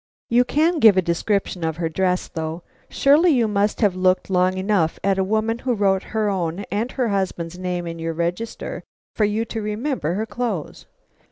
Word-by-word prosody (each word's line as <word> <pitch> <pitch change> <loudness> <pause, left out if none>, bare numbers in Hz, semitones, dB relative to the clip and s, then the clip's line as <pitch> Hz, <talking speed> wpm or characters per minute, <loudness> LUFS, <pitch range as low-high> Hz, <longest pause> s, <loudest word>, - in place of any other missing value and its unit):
"You 240 +1 +5
can 320 +5 +2
give 215 -6 +7
a - - +5
description 180 +1 -1
of 160 -1 -2
her 170 -1 -1
dress, 180 +2 0
though; 160 +1 -5 0.3
surely 295 +6 +4
you 240 -4 +2
must 205 +1 0
have 205 -4 +3
looked 185 +1 +1
long 185 0 +2
enough 190 -4 +1
at 195 0 +2
a - - +3
woman 220 +3 0
who 250 -1 -1
wrote 195 -2 +2
her 220 -1 -1
own 180 -2 -1
and 225 +5 -1
her 250 -4 0
husband's 180 -3 -2
name 180 -1 -3
in 165 0 -6
your 165 0 -3
register, 175 +7 -4 0.3
for 215 - +2
you 215 +2 0
to 225 0 -5
remember 210 - -2
her 215 +3 -1
clothes." 225 -9 -4
195 Hz, 190 wpm, -22 LUFS, 180-225 Hz, 0.3 s, give